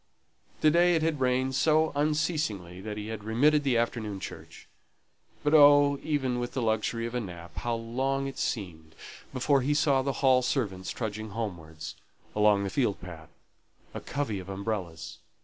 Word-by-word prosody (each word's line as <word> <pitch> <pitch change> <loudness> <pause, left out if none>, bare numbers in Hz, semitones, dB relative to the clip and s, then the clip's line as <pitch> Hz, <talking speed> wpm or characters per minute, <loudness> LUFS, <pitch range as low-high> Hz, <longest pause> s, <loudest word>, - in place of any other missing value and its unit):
To 155 - +5
day 175 +2 +4
it 160 - +1
had 160 -3 0
rained 130 +1 +1
so 155 +3 +3
unceasingly 145 - -1
that 105 +1 -6
he 105 +1 -5
had 110 -2 -6
remitted 145 +8 +3
the 130 -4 +2
afternoon 115 -4 -2
church; - - -9 0.8
but 150 - +1
oh, 145 -2 +7
even 135 -5 -1
with 120 0 -4
the 130 - -2
luxury 110 +1 0
of 115 - -5
a 125 - 0
nap, 85 -5 -9
how 120 -1 -1
long 130 +4 -1
it 135 -1 -6
seemed 80 -8 -4 0.4
before 135 +1 +2
he 145 +3 +1
saw 145 -3 +3
the 135 +1 -1
Hall 130 -1 +6
servants 100 -8 -2
trudging 110 -1 -4
homewards, 85 -8 -6 0.4
along 105 -1 +4
the 100 - -3
field 115 -5 0
path, 80 -3 -10 0.6
a - - -4
covey 135 -9 -3
of 95 +1 -9
umbrellas! 95 -4 -4
120 Hz, 165 wpm, -28 LUFS, 100-140 Hz, 0.8 s, oh